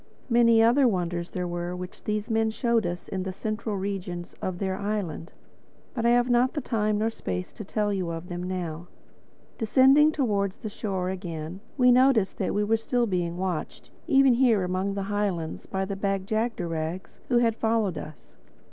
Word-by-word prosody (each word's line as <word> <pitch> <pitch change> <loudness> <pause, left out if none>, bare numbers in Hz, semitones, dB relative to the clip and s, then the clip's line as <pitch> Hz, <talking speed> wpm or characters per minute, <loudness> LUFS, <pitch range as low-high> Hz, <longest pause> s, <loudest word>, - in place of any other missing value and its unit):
Many 230 -1 +5
other 250 +4 +5
wonders 175 -4 -1
there 180 -1 -3
were 175 +1 -3
which 180 0 -8
these 210 0 -1
men 225 -1 +1
showed 230 -2 +1
us 175 0 -5
in 190 - -3
the 190 0 -3
central 215 +2 -3
regions 190 -3 -4
of 185 -1 -3
their 190 0 -1
island. 200 -5 -3 0.6
But 235 -2 0
I - - +5
have 240 0 +4
not 245 +2 +2
time 215 -2 0
or 225 - +1
space 90 - -5
to - - -8
tell 210 +1 -1
you 185 -3 -2
of 165 +1 -5
them 175 -1 -5
now. 175 -2 -4 0.7
Descending 270 +7 +5
towards 205 -10 0
the 220 - -6
shore 190 -3 -3
again, 175 -2 -6 0.2
we 250 -1 +6
noticed 250 -6 +4
that 195 - -1
we 205 - +2
were 225 +2 +2
still 240 +2 0
being 175 -4 -1
watched, 180 -3 -4 0.2
even 275 -4 +5
here 235 -5 +3
among 185 +2 -1
the 200 - -2
highlands, 190 -6 -2
by 190 0 -2
the 200 0 -4
Bag 195 -1 -1
jagderags 180 -6 -3
who 245 - +3
had 230 -2 +3
followed 220 -6 0
us. 155 -1 -12
200 Hz, 180 wpm, -26 LUFS, 180-225 Hz, 0.7 s, we